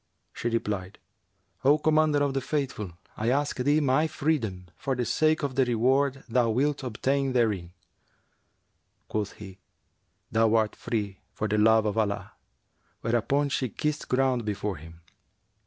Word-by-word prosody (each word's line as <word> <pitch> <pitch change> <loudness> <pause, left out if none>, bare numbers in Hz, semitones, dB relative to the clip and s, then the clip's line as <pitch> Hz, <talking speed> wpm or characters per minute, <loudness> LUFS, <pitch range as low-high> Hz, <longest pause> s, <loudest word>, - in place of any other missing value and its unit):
She 120 - -2
replied, 105 -5 -2 0.7
'O 145 +3 +5
Commander 155 -1 +3
of 140 -1 0
the 135 - 0
Faithful, 130 - -3 0.2
I 110 +2 -1
ask 140 +1 0
of 125 - -1
thee 145 +2 +5
my 145 +3 +3
freedom, 115 - -1
for 135 - -2
the 125 -1 -1
sake 155 +7 +2
of 140 -2 -1
the 135 +1 +3
reward 130 +3 +1
thou 120 0 +2
wilt 140 +6 +1
obtain 135 +2 0
therein.'[FN#364] 105 -8 +1 1.4
Quoth 105 -2 -2
he, 95 -2 -11 0.7
'Thou 115 0 +3
art 110 -1 +2
free 100 -4 -3 0.2
for 110 - -1
the 105 +1 +1
love 110 0 +5
of 105 +1 0
Allah;' 100 -2 -1 0.7
whereupon 120 +5 +1
she 130 -2 -1
kissed 150 +6 -3
ground 130 -2 +2
before 105 -3 -3
him. 80 +2 -13
120 Hz, 150 wpm, -27 LUFS, 105-140 Hz, 1.4 s, O